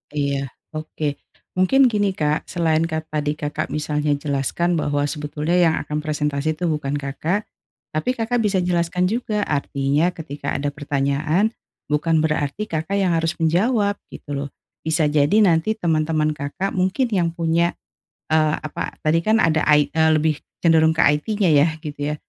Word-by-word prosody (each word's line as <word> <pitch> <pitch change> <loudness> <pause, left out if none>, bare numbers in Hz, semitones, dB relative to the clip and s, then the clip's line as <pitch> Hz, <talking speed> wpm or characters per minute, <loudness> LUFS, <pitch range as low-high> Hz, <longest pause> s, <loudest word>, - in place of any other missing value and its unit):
Iya 140 -1 -1 0.2
oke 155 -2 -4 0.4
mungkin 255 +8 +5
gini, 205 -3 +1
Kak, 150 -3 -1
selain 165 -2 +1
kan 160 -1 -2
tadi 150 -1 -1
Kakak 150 -1 -4
misalnya 150 -1 0
jelaskan 145 +4 -1
bahwa 145 -2 0
sebetulnya 150 +3 -2
yang 165 -3 +4
akan 150 0 -3
presentasi 150 0 -1
itu 175 +2 -2
bukan 150 -3 -2
Kakak, 145 +8 -2 0.4
tapi 155 +12 -1
Kakak 245 0 -1
bisa 195 -3 +2
jelaskan 180 +1 0
juga, 215 -1 -1
artinya 145 0 0
ketika 145 -3 -5
ada 145 +1 -1
pertanyaan 145 +6 0 0.4
bukan 155 +2 +2
berarti 155 +6 -1
Kakak 160 +4 -3
yang 175 -3 +2
harus 165 +1 0
menjawab 200 +5 +2 0.2
gitu 145 -1 -6
loh, 140 - -8 0.4
bisa 160 -1 +2
jadi 145 +1 +2
nanti 180 +2 +3
teman-teman 155 -5 0
Kakak 145 +8 -3
mungkin 190 +8 +1
yang 175 -6 0
punya, 170 +1 +1 0.6
eee, 155 -1 +3
apa 155 - -5
tadi 155 +2 +2
kan 220 +1 +3
ada 160 -1 +2
ai 150 -1 +4
eee, 160 0 +3
lebih 155 -1 +1 0.2
cenderung 160 -1 +4
ke - - +1
IT-nya 180 +6 +2
ya 145 +3 +5
gitu 145 -1 -3
ya, - - -3
160 Hz, 155 wpm, -21 LUFS, 150-175 Hz, 0.6 s, mungkin